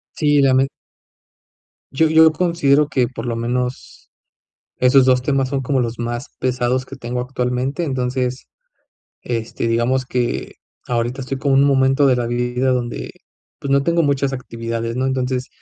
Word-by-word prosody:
Sí, 145 Hz, -2 st, +3 dB
ya 135 Hz, -1 st, +4 dB
me 135 Hz, +1 st, +3 dB, 1.3 s
Yo 160 Hz, +3 st, +3 dB
yo 160 Hz, 0 st, +6 dB
considero 150 Hz, -5 st, +2 dB
que 130 Hz, -3 st, +1 dB
por 120 Hz, -1 st, -7 dB
lo 115 Hz, -1 st, -2 dB
menos, 125 Hz, +2 st, -4 dB, 0.7 s
esos 130 Hz, +1 st, +4 dB
2 125 Hz, -1 st, +3 dB
temas 135 Hz, -1 st, 0 dB
son 135 Hz, -1 st, -2 dB
como 130 Hz, 0 st, 0 dB
los 115 Hz, -1 st, -3 dB
más 120 Hz, +2 st, -4 dB
pesados 125 Hz, 0 st, 0 dB
que 135 Hz, -, -10 dB
tengo 125 Hz, 0 st, -4 dB
actualmente. 125 Hz, +4 st, -2 dB
Entonces, 130 Hz, -2 st, -2 dB, 0.8 s
este, 115 Hz, -1 st, -3 dB
digamos 120 Hz, +3 st, +1 dB
que 125 Hz, -2 st, -2 dB, 0.3 s
ahorita 120 Hz, +2 st, -1 dB
estoy 135 Hz, +1 st, -4 dB
como 140 Hz, -1 st, +2 dB
en 135 Hz, -, +5 dB
un -, -, +4 dB
momento 135 Hz, +1 st, +3 dB
de 130 Hz, -, +4 dB
la 120 Hz, -1 st, -1 dB
vida 125 Hz, +2 st, 0 dB
donde, 120 Hz, -2 st, -2 dB, 0.5 s
pues, 140 Hz, -, -5 dB
no 140 Hz, 0 st, +4 dB
tengo 170 Hz, +2 st, +2 dB
muchas 140 Hz, -1 st, 0 dB
actividades, 115 Hz, -2 st, -4 dB
¿no? 130 Hz, +1 st, 0 dB
Entonces, 130 Hz, -1 st, -1 dB
130 Hz, 160 wpm, -19 LUFS, 125-135 Hz, 1.3 s, yo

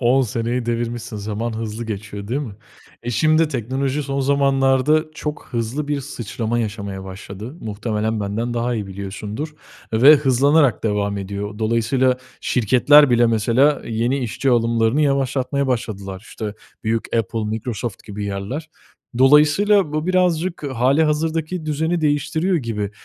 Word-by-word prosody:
On 130 Hz, +2 st, +4 dB
seneyi 120 Hz, +1 st, -2 dB
devirmişsin, 120 Hz, 0 st, -3 dB
zaman 110 Hz, +3 st, -3 dB
hızlı 110 Hz, +1 st, -4 dB
geçiyor 105 Hz, -1 st, -6 dB
değil 135 Hz, +4 st, -1 dB
mi? 125 Hz, -8 st, -6 dB, 0.5 s
E, 120 Hz, -, -3 dB
şimdi 155 Hz, +7 st, +3 dB
de -, -, -3 dB
teknoloji 135 Hz, +2 st, -2 dB
son 140 Hz, 0 st, -2 dB
zamanlarda 135 Hz, +2 st, +3 dB
çok 150 Hz, -1 st, -5 dB
hızlı 120 Hz, +5 st, -2 dB
bir 145 Hz, -1 st, 0 dB
sıçrama 120 Hz, -3 st, -3 dB
yaşamaya 100 Hz, -4 st, -4 dB
başladı. 100 Hz, -, -8 dB
Muhtemelen 110 Hz, 0 st, -2 dB
benden 110 Hz, +4 st, -2 dB
daha 120 Hz, +1 st, 0 dB
iyi 105 Hz, -3 st, -3 dB
biliyorsundur 100 Hz, +9 st, -6 dB, 0.4 s
ve 130 Hz, +7 st, +8 dB
hızlanarak 140 Hz, -1 st, +3 dB
devam 100 Hz, -1 st, 0 dB
ediyor. 100 Hz, +1 st, -5 dB
Dolayısıyla, 115 Hz, +3 st, +2 dB, 0.2 s
şirketler 130 Hz, +5 st, +5 dB
bile 120 Hz, 0 st, +4 dB
mesela, 115 Hz, +6 st, +2 dB
yeni 120 Hz, +4 st, 0 dB
işçi 130 Hz, +2 st, -1 dB
alımlarını 115 Hz, +2 st, +2 dB
yavaşlatmaya 140 Hz, -1 st, 0 dB
başladılar. 100 Hz, -6 st, -3 dB
İşte, 105 Hz, -2 st, -5 dB, 0.3 s
büyük 115 Hz, +1 st, -1 dB
Apple, 115 Hz, 0 st, -1 dB
Microsoft 110 Hz, 0 st, -4 dB
gibi 105 Hz, 0 st, -6 dB
yerler. 100 Hz, +11 st, -4 dB, 0.5 s
Dolayısıyla, 150 Hz, +7 st, +5 dB
bu 155 Hz, +1 st, -2 dB
birazcık 180 Hz, -2 st, +1 dB
halihazırdaki 155 Hz, +5 st, +1 dB
düzeni 160 Hz, +3 st, 0 dB
değiştiriyor 155 Hz, +4 st, +1 dB
gibi. 110 Hz, -8 st, -3 dB
120 Hz, 135 wpm, -21 LUFS, 110-145 Hz, 0.5 s, ve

